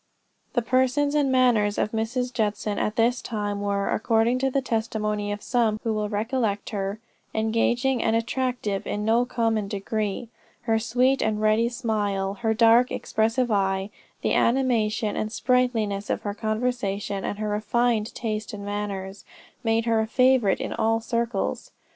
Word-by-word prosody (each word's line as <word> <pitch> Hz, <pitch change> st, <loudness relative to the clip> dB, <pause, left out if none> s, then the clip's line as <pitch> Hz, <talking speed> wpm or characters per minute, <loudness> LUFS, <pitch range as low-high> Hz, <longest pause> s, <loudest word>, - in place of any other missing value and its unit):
The 240 Hz, -, +1 dB
person 260 Hz, +4 st, +2 dB
and 285 Hz, -3 st, +2 dB
manners 235 Hz, -5 st, +3 dB
of 215 Hz, -, 0 dB
Mrs. 245 Hz, +3 st, -2 dB
Judson 210 Hz, -2 st, -1 dB
at 210 Hz, -, -1 dB
this 235 Hz, +2 st, +2 dB
time, 205 Hz, -3 st, -3 dB
were, 200 Hz, -1 st, -1 dB
according 225 Hz, +3 st, +2 dB
to 270 Hz, +1 st, +1 dB
the 275 Hz, -, +1 dB
testimony 215 Hz, -4 st, -2 dB
of 205 Hz, 0 st, -5 dB
some 225 Hz, -4 st, +1 dB
who 225 Hz, -, 0 dB
well 210 Hz, -1 st, -1 dB
recollect 215 Hz, -1 st, -1 dB
her, 200 Hz, 0 st, -3 dB, 0.4 s
engaging 235 Hz, +4 st, +1 dB
and 225 Hz, -, +2 dB
attractive 230 Hz, -3 st, -1 dB
in 210 Hz, 0 st, -2 dB
no 230 Hz, +2 st, +3 dB
common 225 Hz, -4 st, 0 dB
degree. 210 Hz, +2 st, -3 dB, 0.3 s
Her 225 Hz, -2 st, +2 dB
sweet 250 Hz, +4 st, +2 dB
and 215 Hz, -1 st, 0 dB
ready 215 Hz, +2 st, +3 dB
smile, 205 Hz, -5 st, -1 dB
her 220 Hz, -1 st, +1 dB
dark 230 Hz, +2 st, +5 dB
expressive 225 Hz, +3 st, 0 dB
eye, 195 Hz, 0 st, 0 dB, 0.3 s
the -, -, +1 dB
animation 230 Hz, -4 st, +1 dB
and 215 Hz, -, -2 dB
sprightliness 230 Hz, -5 st, 0 dB
of -, -, -1 dB
her 205 Hz, -, -2 dB
conversation, 215 Hz, -3 st, -2 dB
and 205 Hz, -, -3 dB
her 215 Hz, 0 st, -2 dB
refined 220 Hz, +1 st, 0 dB
taste 215 Hz, -2 st, -3 dB
and 200 Hz, -1 st, -6 dB
manners, 200 Hz, -1 st, -4 dB, 0.4 s
made 225 Hz, 0 st, +1 dB
her 225 Hz, -1 st, +2 dB
a 220 Hz, -, 0 dB
favorite 255 Hz, -4 st, +3 dB
in -, -, -3 dB
all 225 Hz, +1 st, +1 dB
circles. 235 Hz, +1 st, -2 dB
220 Hz, 155 wpm, -25 LUFS, 210-240 Hz, 0.4 s, dark